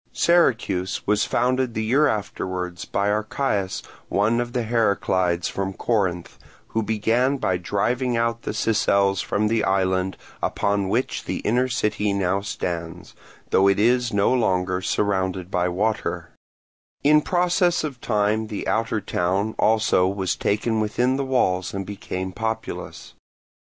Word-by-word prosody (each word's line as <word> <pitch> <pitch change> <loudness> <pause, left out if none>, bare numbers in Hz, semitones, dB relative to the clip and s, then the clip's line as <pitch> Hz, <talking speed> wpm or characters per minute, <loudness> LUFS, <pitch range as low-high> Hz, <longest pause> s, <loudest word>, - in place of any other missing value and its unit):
Syracuse 115 - +1
was 105 0 +2
founded 125 0 0
the 110 - -1
year 135 +7 +3
afterwards 95 -6 -3
by 100 +1 0
Archias, 105 -2 -1 0.3
one 110 +4 +2
of 120 0 -5
the 125 - 0
Heraclids 95 -6 +1
from 95 0 -3
Corinth, 95 -6 -1 0.3
who 115 - 0
began 115 +5 +1
by 95 -8 0
driving 115 +7 -1
out 115 0 0
the - - -6
Sicels 100 -3 +2
from 105 +1 0
the 115 +1 +1
island 95 -1 0 0.2
upon 100 -1 0
which 120 +6 -1
the - - -2
inner 125 +4 +1
city 105 -4 0
now 100 0 0
stands, 85 -5 -5 0.4
though 95 - +4
it 100 0 +3
is 120 +2 +3
no 100 +3 +2
longer 95 -6 +1
surrounded 95 -2 -1
by 90 0 +1
water: 105 +5 -2 0.7
in 150 +1 +5
process 175 0 +1
of 135 -6 -5
time 110 0 0
the 105 -2 -5
outer 110 -1 0
town 95 +5 -1
also 110 -4 +3
was 95 -2 -1
taken 110 +2 0
within 120 +4 +1
the 140 - -1
walls 95 -9 0
and 95 0 -3
became 95 -2 -5
populous. 110 +3 -5
105 Hz, 140 wpm, -23 LUFS, 95-120 Hz, 0.7 s, in